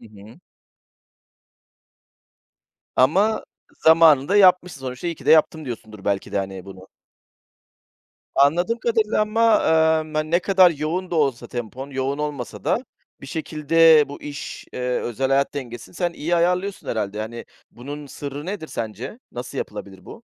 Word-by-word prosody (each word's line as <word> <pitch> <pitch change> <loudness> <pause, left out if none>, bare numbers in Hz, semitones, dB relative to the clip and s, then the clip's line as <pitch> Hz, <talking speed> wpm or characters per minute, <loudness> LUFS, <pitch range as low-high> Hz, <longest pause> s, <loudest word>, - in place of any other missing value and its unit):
Hı 115 - -14
hı. 105 - -15 2.6
Ama 195 +12 +3 0.4
zamanında 160 +1 +6
yapmışsın 180 -6 +4
sonuçta, 130 +4 -6
"iyi 170 - -2
ki - - -15
de - - +4
yaptım," 160 0 +4
diyorsundur 110 -5 -8
belki 100 -1 -2
de, - - 0
hani, 95 -1 -5
bunu. 95 -1 -12 1.5
Anladığım 175 +12 +3
kadarıyla 220 -2 +1
ama, 225 +1 +3 0.5
emm, 155 0 -9
hani, 155 0 -1
ne 170 - +4
kadar 185 -1 +5
yoğun 165 +5 -3
da - - -3
olsa 135 -6 0
tempon, 125 +4 -6
yoğun 135 +2 -2
olmasa 145 -5 -5
da - - 0 0.4
bir 140 - -10
şekilde 160 +1 +4
bu 145 - -10
iş, 145 0 -7
eee, - - -6 0.2
özel 130 +3 -2
hayat 140 +1 +1
dengesini 120 -2 -7
sen 175 -1 -1
iyi 170 +2 -1
ayarlıyorsun, 180 +3 0
herhâlde. 105 -2 -2
Yani, 115 +2 -6 0.3
bunun 145 +4 -8
sırrı 145 +3 -7
nedir 190 -4 -5
sence? 115 - -6
Nasıl - - -6
yapılabilir - - -7
bu? - - -12
150 Hz, 145 wpm, -22 LUFS, 125-175 Hz, 2.6 s, zamanında